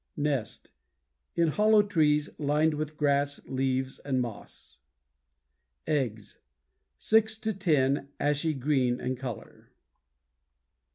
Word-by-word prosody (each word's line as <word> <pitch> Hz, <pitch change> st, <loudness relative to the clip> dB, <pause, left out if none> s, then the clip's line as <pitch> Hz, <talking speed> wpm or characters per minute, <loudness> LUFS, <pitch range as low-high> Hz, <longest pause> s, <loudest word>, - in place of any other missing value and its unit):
NEST 145 Hz, -6 st, -2 dB, 0.6 s
In 170 Hz, -1 st, +3 dB
hollow 210 Hz, +5 st, +4 dB
trees, 150 Hz, -7 st, +2 dB
lined 150 Hz, +2 st, +2 dB
with 150 Hz, 0 st, -4 dB
grass, 140 Hz, -1 st, +1 dB
leaves, 130 Hz, 0 st, -2 dB
and 135 Hz, -2 st, -1 dB
moss. 120 Hz, -4 st, -7 dB, 1.1 s
EGGS 120 Hz, -8 st, -2 dB, 0.6 s
Six 220 Hz, 0 st, +3 dB
to 220 Hz, 0 st, -2 dB
ten, 145 Hz, -8 st, +1 dB
ashy 150 Hz, +2 st, 0 dB
green 130 Hz, -2 st, +1 dB
in 130 Hz, +1 st, -2 dB
color. 125 Hz, -3 st, -8 dB
145 Hz, 100 wpm, -28 LUFS, 130-155 Hz, 1.1 s, hollow